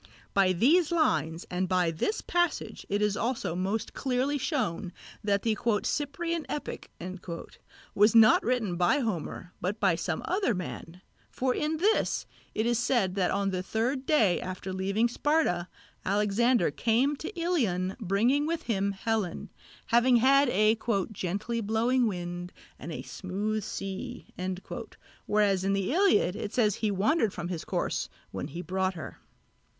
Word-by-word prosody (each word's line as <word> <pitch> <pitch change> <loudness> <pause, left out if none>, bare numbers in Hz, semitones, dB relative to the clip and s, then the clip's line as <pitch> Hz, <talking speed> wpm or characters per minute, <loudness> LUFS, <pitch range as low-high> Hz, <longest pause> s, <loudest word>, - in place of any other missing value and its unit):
By 195 -2 +4
these 295 - +4
lines 165 - +1
and 180 0 -1
by 180 -3 +2
this 165 - -1
passage 350 -2 -1
it 205 +1 +1
is 210 -1 +1
also 225 -6 -1
most 200 +5 -2
clearly 270 +2 0
shown 215 - -1 0.3
that 200 -1 +1
the 225 -2 +1 0.3
"Cyprian 330 +3 -2
Epic" 295 - -5 1.0
was 210 +3 +4
not 220 -1 +7
written 225 -7 0
by 175 +10 +3
Homer 180 - -4
but 200 +4 -2
by 195 -4 +3
some 165 0 -2
other 370 - +1
man: 180 0 -7 0.3
for 255 0 0
in 305 +3 -1
this 415 +7 +1 0.3
it 220 - +1
is 240 -1 +2
said 235 -7 +1
that 185 -2 +1
on 200 -1 0
the 185 -1 -1
third 245 +7 -1
day 220 - +4
after 185 +1 -5
leaving 195 +5 +1
Sparta 240 - +1 0.4
Alexander 210 - +2
came 235 - +2
to 315 - -5
Ilion 210 - 0
bringing 230 - +2
with 330 0 -2
him 200 -3 0
Helen, 210 -3 -2 0.3
having 240 +2 +4
had 270 +3 +5
a 215 0 +4 0.4
"gently 205 +5 -2
blowing 230 +4 +2
wind 175 -2 -4 0.3
and 160 - -7
a - - -5
smooth 205 +3 -3
sea," 195 +7 -5 1.0
whereas 205 -3 +2
in 195 +1 +1
the 195 +5 0
Iliad 360 - +3
it 205 - -5
says 215 -4 +3
that - - -8
he 220 - +1
wandered 210 - +2
from 175 0 -4
his 175 -3 -4
course - - -2 0.2
when - - -4
he 170 +5 -6
brought 185 +2 -1
her. 160 - -8
210 Hz, 150 wpm, -29 LUFS, 185-255 Hz, 1.0 s, not